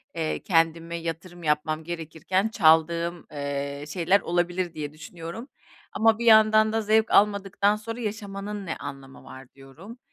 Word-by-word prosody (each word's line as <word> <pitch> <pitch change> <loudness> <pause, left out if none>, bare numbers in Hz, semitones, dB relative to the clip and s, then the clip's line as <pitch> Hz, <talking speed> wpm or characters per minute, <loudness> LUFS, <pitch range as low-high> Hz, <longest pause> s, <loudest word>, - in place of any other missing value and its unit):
eee, 160 -1 -2
kendime 165 -1 +1
yatırım 170 +1 -7
yapmam 155 +1 0
gerekirken 170 +5 -2
çaldığım, 170 -2 +2
eee, 140 0 -4
şeyler 180 +5 +2
olabilir 175 0 -1
diye 150 -1 -6
düşünüyorum. 170 - -9 0.4
Ama 225 0 +3
bir 235 - -3
yandan 215 -1 +6
da 225 - +1
zevk 220 +1 +2
almadıktan 200 0 +3
sonra 225 +3 -7
yaşamanın 205 -1 -5
ne 160 - -3
anlamı 135 -1 -9
var 130 -1 -13
diyorum. 160 - -13
175 Hz, 135 wpm, -25 LUFS, 155-210 Hz, 0.4 s, yandan